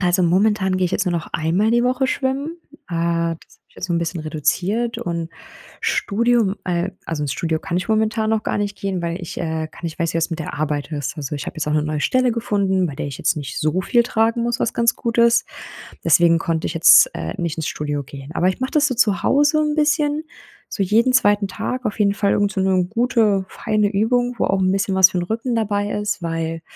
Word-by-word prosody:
Also 180 0 +2
momentan 190 +2 +2
gehe 185 - +1
ich 175 - -1
jetzt 200 - +1
nur 175 - +1
noch 170 -2 -3
einmal 180 +8 +1
die 240 +1 +3
Woche 255 +1 +1
schwimmen. 275 +6 -2 0.3
Äh, 170 -1 -1
das - - -23
habe - - -60
ich - - -29
jetzt 185 - -4
so 175 - -3
'n 170 - +2
bisschen 170 0 -3
reduziert 185 +9 -1
und 170 -1 -4 0.5
Studium 230 -1 +1
äh, 180 +1 -1 0.2
also 155 -2 -3
ins 140 - -2
Studio 160 0 -1
kann 170 - -4
ich 180 - -2
momentan 220 0 +1
noch 220 -1 +1
gar - - -2
nicht 205 0 -2
gehen, 195 -2 -3
weil 170 +2 -3
ich, 175 - -7
äh, 160 -2 -3
gar - - -15
nicht 165 +1 -5
weiß, 170 -1 -1
wie - - +1
das 165 +1 -1
mit 165 - -4
der - - -5
Arbeit 150 0 -2
ist. 145 +1 -4
Also, 145 -1 -4
ich - - -6
habe - - -6
jetzt 160 - -3
auch - - 0
'ne 150 - +2
neue 155 0 -2
Stelle 255 +6 +2
gefunden, 200 -5 0
bei 145 - -6
der 140 - -4
ich 140 - -7
jetzt - - +1
nicht 145 -3 -5
so 155 +4 +1
viel 240 +4 +3
tragen 230 0 +1
muss, 240 +2 -1
was - - 0
ganz 235 -1 +2
gut 235 0 -3
ist. 235 0 +4 0.6
Deswegen 165 +1 +5
konnte 165 -1 -2
ich - - -4
jetzt, 165 - +7
äh, - - -4
nicht 170 -2 -2
ins 160 -1 -3
Studio 145 -1 -3
gehen. 140 +1 -10
Aber 180 - +2
ich 190 - -2
mache 260 - -2
das 300 -2 +3
so 255 - -2
zu 210 -7 +2
Hause 295 +2 +3
'n 300 -1 0
bisschen 305 0 +1 0.4
so 200 - -2
jeden 230 +7 +3
2. 205 -5 +3
Tag 250 +6 -4
auf 210 - -4
jeden 200 -1 +2
Fall 200 -1 +1
irgend 205 0 +1
so 195 - -2
'ne 190 -1 +2
gute, 220 -3 +1
feine 210 -1 0
Übung, 245 +4 +1
wo - - +1
auch 195 0 +1
'n 185 0 +2
bisschen 195 0 0
was 190 0 +7
für 180 - -2
'n 175 - -1
Rücken 230 +5 -2
dabei 205 -2 -1
ist. 210 -3 -2
Weil 165 0 -3
190 Hz, 245 wpm, -20 LUFS, 165-230 Hz, 0.6 s, jetzt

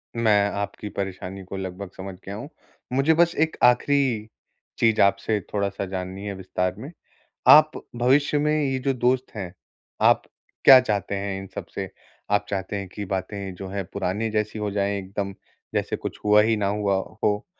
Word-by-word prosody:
मैं 105 -3 +3
आपकी 105 +1 -5
परेशानी 95 0 -4
को 95 +1 -7
लगभग 95 0 -6
समझ 95 0 -7
गया 100 - -5
हूँ, 120 +7 -7 0.4
मुझे 135 +5 +4
बस 170 +1 +3
एक 160 0 +1
आख़िरी 125 -3 +3 0.5
चीज़ 110 -1 +4
आपसे 105 +2 +2
थोड़ा-सा 100 -1 -1
जाननी 95 +1 -5
है 100 - -3
विस्तार 90 -1 -2
में, 140 - -8 0.6
आप 155 +1 +9 0.3
भविष्य 140 +5 +3
में 150 +1 +2
ये 135 -1 0
जो 135 +1 0
दोस्त 125 +1 0
हैं, 95 -4 -5 0.5
आप - - +5 0.4
क्या 135 - +11
चाहते 105 -5 -2
हैं 100 0 -3
इन 95 - -8
सब - - -5
से? 95 -1 -3 0.4
आप 105 0 +2
चाहते 95 +1 -3
हैं 100 -1 -4
कि 100 +3 -6
बातें 95 0 -4
जो 95 +2 -7
है 100 +1 -3
पुराने 100 +3 -1
जैसी 110 0 -1
हो 105 -1 -2
जाएँ 100 0 0
एकदम 100 +1 -4 0.4
जैसे - - 0
कुछ - - -6
हुआ 105 0 +6
ही 110 +1 +2
ना 105 -2 0
हुआ 100 0 +1 0.3
हो 105 +1 +1
100 Hz, 175 wpm, -24 LUFS, 95-120 Hz, 0.6 s, क्या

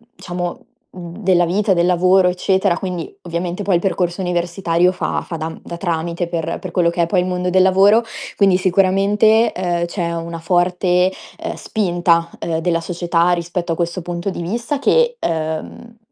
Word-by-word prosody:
diciamo, 175 -1 -5 0.3
mhmm, 175 -1 -9
della 180 -2 +3
vita, 195 +4 +1
del 170 0 +2
lavoro, 180 +1 +4
eccetera; 190 0 +1
quindi, 180 -3 -5
ovviamente 175 +2 -4
poi 195 -2 +2
il 170 - +1
percorso 180 -1 -1
universitario 175 0 +1
fa - - -2
fa 165 - -5
da 155 - -3
m - - -10
da 170 - -7
tramite 170 -1 -2
per 165 -2 -3
per 185 - -7
quello 170 -1 +2
che 170 0 0
è - - +2
poi 180 +2 +1
il - - -2
mondo 180 0 -1
del 185 +1 +4
lavoro. 195 +4 +5 0.3
Quindi, 195 -3 +4
sicuramente, 195 +4 +3
ehm, 175 -2 -1
c'è 170 -1 -3
una 165 0 -5
forte, 180 +1 +2 0.3
ehm, - - -5
spinta, 175 -5 0
ehm, 165 -1 -2
della 165 0 0
società 170 0 0
rispetto 175 0 -2
a - - -3
questo 170 +1 -2
punto 175 +2 -4
di 175 - -6
vista 235 - -3
che, 480 - +3
ehm, 160 - -4
175 Hz, 180 wpm, -18 LUFS, 170-190 Hz, 0.3 s, lavoro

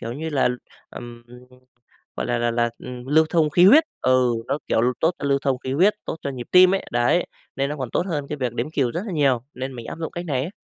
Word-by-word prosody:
kiểu 115 - -5
như 160 +5 -5
là, 135 -4 +2 0.4
ừm, 120 -1 -10 0.9
gọi - - -3
là - - 0
là 120 0 0
là, 120 0 0
ừm, 125 0 -9
lưu 155 +3 +4
thông 160 -3 +2
khí 175 +4 +5
huyết 300 +11 +7 0.2
ừ, 130 -1 +3
nó, 140 - -1
kiểu, - - +1
lưu 125 +2 +2
tốt 160 - +3
cho - - -7
lưu 140 0 +3
thông 135 -2 0
khí 130 +1 -5
huyết, 185 +9 +3
tốt - - -4
cho 140 - -3
nhịp 125 -3 -7
tim 185 +1 +7
ấy, 195 - -2
đấy, 120 +9 +2 0.3
nên 135 +1 -1
nó 150 - -4
còn 130 -4 -5
tốt 180 - -1
hơn 145 -6 -3
cái 150 - -4
việc 125 -2 -1
đếm 125 +6 -3
cừu 130 -6 0
rất 170 - -3
là 195 - -5
nhiều 135 -6 +2
nên 130 +2 -5
mình 120 -2 -8
áp - - -7
dụng 160 - -4
cách 175 +1 -5
này 135 -4 -1
ấy. 165 - -4
140 Hz, 270 wpm, -22 LUFS, 125-160 Hz, 0.9 s, huyết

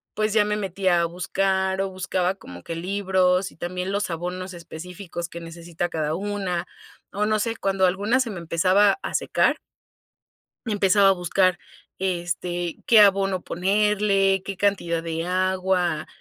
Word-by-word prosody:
pues, 215 0 0
ya 210 -2 +4
me 210 0 0
metía 190 -3 +1
a - - +2
buscar 190 +2 0
o 195 - -1
buscaba 185 0 -1
como 90 - -12
que 165 - -5
libros 185 0 +1
y - - -21
también 180 +2 -4
los 205 +1 -1
abonos 180 +2 -4
específicos 175 +1 -7
que 170 - -8
necesita 170 +1 -5
cada 155 -1 -2
una 195 -2 -2 0.5
o 210 +1 -1
no 215 0 +2
sé 225 +2 -1
cuando 195 -2 +1
alguna 200 +7 +1
se 235 -3 -2
me 190 - -6
empezaba 185 +5 +3
a - - -4
secar - - +1 1.1
empezaba 200 -2 +4
a - - +6
buscar, 185 0 +1 0.4
este, 175 -1 -2
qué 225 - +6
abono 195 -2 +3
ponerle, 195 +1 +2
qué 195 -1 -6
cantidad 175 -5 0
de 165 0 -3
agua, 185 -3 0
185 Hz, 150 wpm, -24 LUFS, 175-195 Hz, 1.1 s, a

